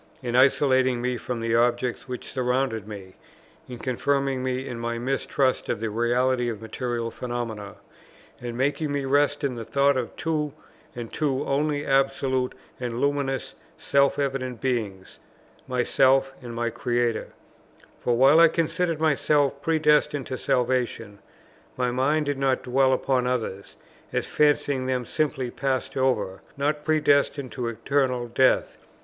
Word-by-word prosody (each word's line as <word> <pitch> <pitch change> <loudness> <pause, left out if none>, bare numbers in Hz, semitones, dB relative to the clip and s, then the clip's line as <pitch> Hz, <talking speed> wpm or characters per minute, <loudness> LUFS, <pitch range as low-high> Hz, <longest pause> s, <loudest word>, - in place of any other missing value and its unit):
in 120 -1 -2
isolating 130 -1 +4
me 125 +1 -1
from 120 0 -4
the 115 0 -1
objects 120 +2 +1
which 125 -1 -6
surrounded 125 -4 -1
me, 100 -3 -9 0.6
in 125 - -6
confirming 135 +2 0
me 130 +1 -2
in 120 -3 -5
my 115 0 -2
mistrust 130 +1 0
of - - -1
the 110 -1 -3
reality 120 +2 +1
of 110 -3 -5
material 115 +1 -3
phenomena, 115 -5 -5 0.7
and 120 -1 -5
making 145 +3 0
me 140 -1 -1
rest 145 +1 +2
in 140 -2 0
the 115 -1 -6
thought 140 +5 +2
of 125 -2 -3
two 150 -1 -2 0.4
and 120 -2 -7
two 145 -2 0
only 145 +1 0
absolute 135 -1 +1 0.2
and 120 -1 -3
luminously 140 -2 -1 0.2
self 140 -1 +2
evident 135 -3 -2
beings, 110 -8 -3 0.5
myself 135 +1 +2
and 120 -2 -8
my 120 0 -1
Creator; 120 0 -1 0.7
for 120 -1 0
while 135 +5 +6
I 165 - +9
considered 165 0 -1
myself 145 -2 +2
predestined 150 -3 +2
to 130 - -4
salvation, 125 -5 -1 0.6
my 125 -1 0
mind 145 +5 +1
did 145 -1 -2
not 135 -1 +1
dwell 130 +1 +3
upon 130 -1 +1
others, 110 -6 -3 0.4
as - - -1
fancying 145 -3 +1
them 130 -1 -1
simply 135 -2 -1
passed 135 -1 -2
over, 105 -8 0 0.2
not 150 +1 -1
predestined 145 -3 +2
to 125 -2 -3
eternal 125 +1 0
death. 130 +2 +2
130 Hz, 145 wpm, -25 LUFS, 120-140 Hz, 0.7 s, I